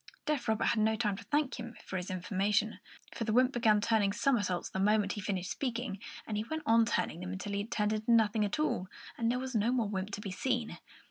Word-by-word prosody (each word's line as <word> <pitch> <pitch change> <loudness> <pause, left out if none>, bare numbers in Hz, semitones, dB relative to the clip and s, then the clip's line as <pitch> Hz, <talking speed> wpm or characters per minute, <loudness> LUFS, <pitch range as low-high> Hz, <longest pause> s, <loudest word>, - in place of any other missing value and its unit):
Deaf 285 -6 -1
Robert 220 0 +1
had 230 - +1
no 220 +1 +3
time 215 -3 0
to 220 - -9
thank 295 -1 0
him 235 0 -7
for - - -6
his 180 +1 -3
information, 195 +3 0 0.3
for - - -3
the 220 - -1
wymp 255 +3 +4
began 225 -4 +3
turning 210 -2 +2
somersaults 205 -5 +1
the 190 - -3
moment 205 0 +3
he 205 - -5
had - - -9
finished 185 -3 -2
speaking, 245 -6 -3 0.3
and 215 - -3
he 210 - 0
went 315 +5 -4
on 230 0 +5
turning 165 - -1
them 180 +1 -5
until 200 +2 -5
he 200 0 0
turned 215 -2 0
into 215 +2 -3
nothing 220 -1 +4
at 205 -1 -1
all, 300 -11 0 0.3
and 230 -1 0
there 245 - +1
was 260 0 -4
no 225 +1 +2
more 240 -4 +1
wymp 195 -1 -3
to 200 - -5
be 205 -2 -5
seen. 240 +3 -2
215 Hz, 245 wpm, -32 LUFS, 200-235 Hz, 0.3 s, on